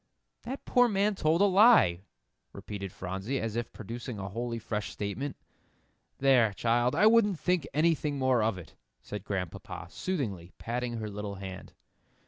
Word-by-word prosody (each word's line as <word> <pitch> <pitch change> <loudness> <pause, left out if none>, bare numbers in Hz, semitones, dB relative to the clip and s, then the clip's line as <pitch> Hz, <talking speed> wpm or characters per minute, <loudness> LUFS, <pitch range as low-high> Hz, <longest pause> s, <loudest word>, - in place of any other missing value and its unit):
"That 260 +4 -7
poor 245 0 +4
man 205 -1 +2
told 165 -2 +1
a - - +7
lie," 195 - +6 0.5
repeated 100 -2 -6
Phronsie, 95 +10 -4
as 115 -1 -3
if 120 0 -3
producing 115 +2 -7
a 95 -1 -5
wholly 115 +3 -3
fresh 105 -2 -3
statement. 120 +8 -4 0.8
"There, 125 -6 +4
child, 120 +4 +1
I 210 - +4
wouldn't 215 -4 +5
think 180 -5 0
anything 150 -1 +1
more 130 -3 +2
of 110 -3 +1
it," 90 - -11 0.3
said 105 -2 -6
Grandpapa, 90 -3 -5
soothingly, 105 - -3
patting 120 +1 -3
her 110 -2 -4
little 105 0 -5
hand. 95 -1 -8
120 Hz, 150 wpm, -29 LUFS, 100-160 Hz, 0.8 s, a